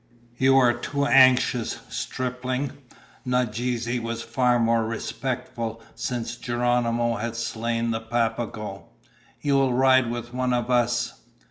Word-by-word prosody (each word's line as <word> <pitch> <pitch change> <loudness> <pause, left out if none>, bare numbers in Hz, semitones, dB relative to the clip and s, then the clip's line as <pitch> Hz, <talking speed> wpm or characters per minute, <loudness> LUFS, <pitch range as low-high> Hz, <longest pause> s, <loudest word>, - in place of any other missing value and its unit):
"You 135 +1 +5
are 125 -2 +5
too 140 +3 -2
anxious, 130 -3 +4
stripling." 130 +2 -3 0.5
Nadeze 125 -1 -1
was 115 0 -4
far 120 +1 +2
more 115 -1 +2
respectful 115 0 -4
since 120 -1 -4
Geronimo 120 -1 0
had 115 +2 -4
slain 115 0 -2
the 110 - -1
Papago. 115 -3 -3 0.5
"You 145 - +1
will 135 -2 +2
ride 130 -1 +4
with 120 0 -5
one 125 0 0
of 120 0 -1
us." 120 -1 +1
120 Hz, 120 wpm, -25 LUFS, 115-125 Hz, 0.5 s, You